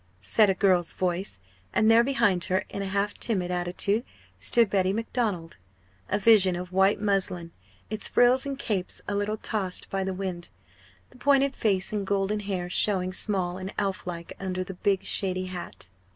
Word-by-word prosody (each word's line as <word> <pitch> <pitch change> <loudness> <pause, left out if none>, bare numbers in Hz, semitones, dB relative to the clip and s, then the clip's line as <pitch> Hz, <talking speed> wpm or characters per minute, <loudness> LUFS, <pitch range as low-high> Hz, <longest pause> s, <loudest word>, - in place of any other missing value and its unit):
said 200 - +4
a 190 - +2
girl's 185 -4 +2
voice; 180 - -2 0.4
and 220 +1 +4
there 230 +1 +6
behind 205 -9 +2
her, 185 +1 0
in 200 - -5
a 195 - -3
half 200 +1 -1
timid 185 -6 0
attitude, 180 +5 0 0.4
stood 230 - +4
Betty 190 -1 +1
Macdonald, 210 - -2 0.5
a 200 - +1
vision 200 -3 +5
of 180 +1 -6
white 190 +2 +3
muslin, 190 -4 -1 0.4
its 215 - -1
frills 245 +2 +4
and 275 -1 -4
capes 200 -8 -3
a 205 - -2
little 205 +1 -1
tossed 200 -4 -2
by 195 0 -1
the 190 - -2
wind, 185 -2 -4 0.6
the 250 - -18
pointed 275 0 +3
face 195 -2 0
and 200 -2 -2
golden 200 +1 0
hair 195 -3 -3
showing 185 0 +1
small 185 -2 -1
and 190 +1 -7
elf 195 -2 -2
like 170 -1 -6
under 185 -1 -3
the 190 - -7
big 195 +1 0
shady 185 -2 0
hat. 175 - -8
195 Hz, 175 wpm, -27 LUFS, 180-210 Hz, 0.6 s, there